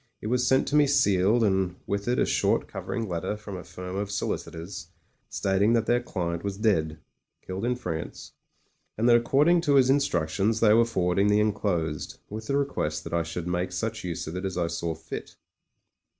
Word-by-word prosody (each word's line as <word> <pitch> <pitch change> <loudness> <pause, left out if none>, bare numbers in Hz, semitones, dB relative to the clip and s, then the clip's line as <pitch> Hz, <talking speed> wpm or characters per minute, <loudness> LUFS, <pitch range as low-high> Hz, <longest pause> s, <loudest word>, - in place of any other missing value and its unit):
It - - -10
was 125 0 +2
sent 130 0 +3
to 145 - 0
me 150 -1 +5
sealed, 105 -4 +3
and 95 -3 +1
with 100 +1 -3
it 125 +1 +1
a - - +3
short - - +1
covering 115 -1 -4
letter 90 +3 -3
from 105 -2 -8
a 90 - -7
firm 90 +1 -7
of 100 0 -2
solicitors 95 -2 -4 0.4
stating 100 +3 +1
that 115 -2 +2
their 120 +1 +2
client 85 -6 -3
was 100 -1 -3
dead 80 -8 +1 0.2
— - - -57
Skilled 95 +4 -4
in 125 +1 +1
France 85 -10 -6 0.3
— - - -22
^and 115 - +1
that 120 -1 +7
according 145 +9 +4
to 145 -4 +2
his 130 -1 +5
in 140 - +5
structions 100 - 0
they 105 -2 +5
were 115 +1 +5
forwarding 95 -3 +1
the 105 0 +4
enclosed, 90 -8 -1
with 110 +1 -6
the 140 - +1
request 75 - -1
that - - -7
I 85 - +2
should 85 +1 -5
make 90 +1 -1
such 110 +4 -3
use 85 -2 -4
of 80 - -6
it 90 - -4
as 95 -2 -3
I 85 - +1
saw 85 0 -3
fit. 80 - -8
100 Hz, 205 wpm, -27 LUFS, 90-115 Hz, 0.4 s, that